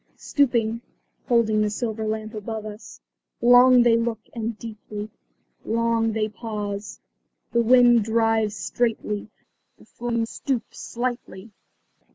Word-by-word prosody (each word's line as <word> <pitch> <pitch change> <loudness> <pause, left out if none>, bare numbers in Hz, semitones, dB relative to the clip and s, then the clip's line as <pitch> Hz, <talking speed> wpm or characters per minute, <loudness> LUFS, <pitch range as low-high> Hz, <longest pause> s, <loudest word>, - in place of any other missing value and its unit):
Stooping, 235 -5 +1 0.5
holding 220 -3 +3
their 210 - +1
silver 220 0 -3
lamp 215 +1 -3
above 215 0 -5
us, 210 -1 -10 0.4
long 245 +1 +7
they 235 -1 +5
look 230 -1 0 0.2
and 230 -1 -4
deeply. 215 -1 -8 0.5
Long 230 0 +1
they 215 -1 0
pause. 210 -2 -6 0.5
The 235 - +3
wind 240 -1 +5
drives 225 -1 +1
straightly; 220 -3 -2 0.5
the - - -19
flame 235 -1 -2
stoops 245 +1 -4
slightly. 235 -4 -5
225 Hz, 115 wpm, -24 LUFS, 215-235 Hz, 0.5 s, long